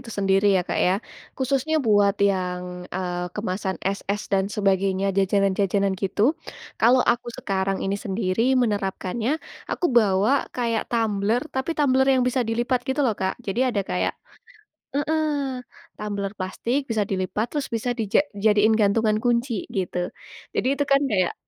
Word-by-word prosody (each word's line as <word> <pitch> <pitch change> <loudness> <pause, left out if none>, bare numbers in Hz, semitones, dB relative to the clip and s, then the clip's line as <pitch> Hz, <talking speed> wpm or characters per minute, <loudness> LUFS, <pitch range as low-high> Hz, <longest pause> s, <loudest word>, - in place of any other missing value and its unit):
itu 260 - -13
sendiri 195 -1 +2
ya 180 - 0
Kak - - -2
ya. 180 - +3 0.4
Khususnya 275 +4 0
buat 205 -7 +3
yang, 180 -2 -1
eee, 180 -1 -3
kemasan 190 -2 -2
es-es 200 +1 -2
dan 195 0 +2
sebagainya, 195 -1 +1
jajanan-jajanan 195 0 +2
gitu. 200 +7 +1 0.5
Kalau 250 +2 +5
aku 240 0 +1
sekarang 195 -1 -1
ini 195 +1 0
sendiri 215 +6 0
menerapkannya, 215 +2 0 0.3
aku 355 - 0
bawa 215 +4 +3
kayak 230 -2 -1
tumbler, 225 +1 0
tapi 265 +4 -2
tumbler 265 -2 +3
yang 255 - +2
bisa 250 +1 +1
dilipat 240 +2 0
gitu 265 +3 0
loh 240 - +3
Kak. 190 -2 -2
Jadi, 200 +5 -1
ada 220 -5 0
kayak - - -1 0.8
heeh. 290 -3 0 0.4
Tumbler 200 -2 -3
plastik, 230 +8 -1
bisa 220 -3 +1
dilipat, 195 +3 -2
terus 290 -3 -2
bisa 235 +2 -1
dija 230 +1 +1
jadiin 210 +1 +3
gantungan 215 +1 +3
kunci, 235 -2 0
gitu. 185 -2 -3 0.6
Jadi - - +1
itu 285 - +2
kan 275 0 +5
kayak, 185 -4 +1
210 Hz, 145 wpm, -24 LUFS, 195-245 Hz, 0.8 s, Kalau